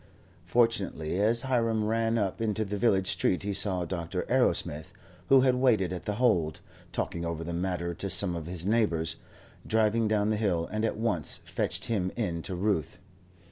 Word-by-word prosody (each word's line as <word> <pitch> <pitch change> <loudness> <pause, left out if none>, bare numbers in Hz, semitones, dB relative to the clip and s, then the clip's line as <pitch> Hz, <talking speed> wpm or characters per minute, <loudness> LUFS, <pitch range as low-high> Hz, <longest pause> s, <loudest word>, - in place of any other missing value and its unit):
Fortunately 100 -8 0
as 115 +4 +2
Hiram 115 -4 +1
ran 115 +1 +1
up 100 -1 -1
into 110 -1 -1
the 105 +1 -4
village 100 -3 +2
street 95 0 0
he 100 0 -2
saw 95 -3 0
Dr. 85 -1 -4
Arrowsmith 75 +2 +1 0.4
who 135 -1 +7
had 130 -1 +4
waited 115 -8 +2
at 90 - -6
The 105 - -2
Hold, 100 -10 +1 0.3
talking 85 - -3
over 85 -1 -3
the 85 +1 -5
matter 85 -1 -2
to 100 +3 -4
some 95 -1 +5
of 85 -1 -6
his 90 -1 -3
neighbours 85 -7 +1 0.5
driving 110 0 +2
down 105 -1 +1
the 110 - 0
hill, 90 -6 0
and 110 0 -2
at 115 - -1
once 110 -9 0
fetched - - -1
him 95 -5 -1
in 90 -8 -2
to 95 - -5
Ruth. 90 -4 -1
100 Hz, 180 wpm, -28 LUFS, 85-115 Hz, 0.5 s, who